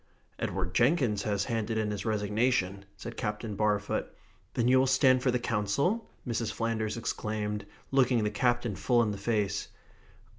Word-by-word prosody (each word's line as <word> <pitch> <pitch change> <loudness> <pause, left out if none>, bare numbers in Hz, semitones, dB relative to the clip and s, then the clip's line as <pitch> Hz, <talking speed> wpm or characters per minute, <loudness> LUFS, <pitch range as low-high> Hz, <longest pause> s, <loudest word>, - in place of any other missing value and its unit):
"Edward 90 -1 -2
Jenkinson 120 - +2
has 100 -1 +1
handed 115 -1 -1
in 105 -1 0
his 105 +2 -4
resignation," 105 -2 0
said - - -7
Captain 105 -1 -3
Barfoot. 105 -1 0 0.5
"Then 120 - +2
you 130 +1 +6
will 135 - +3
stand 130 -1 +4
for 125 - +2
the 125 - +2
Council?" 120 - 0 0.2
Mrs. 115 -2 -1
Flanders 115 -1 -1
exclaimed, 105 -2 -3 0.2
looking 125 -4 +3
the 105 - 0
Captain 120 -1 +1
full 120 +4 +3
in 105 - 0
the 100 - -5
face. 105 -1 0
110 Hz, 155 wpm, -30 LUFS, 105-125 Hz, 0.5 s, you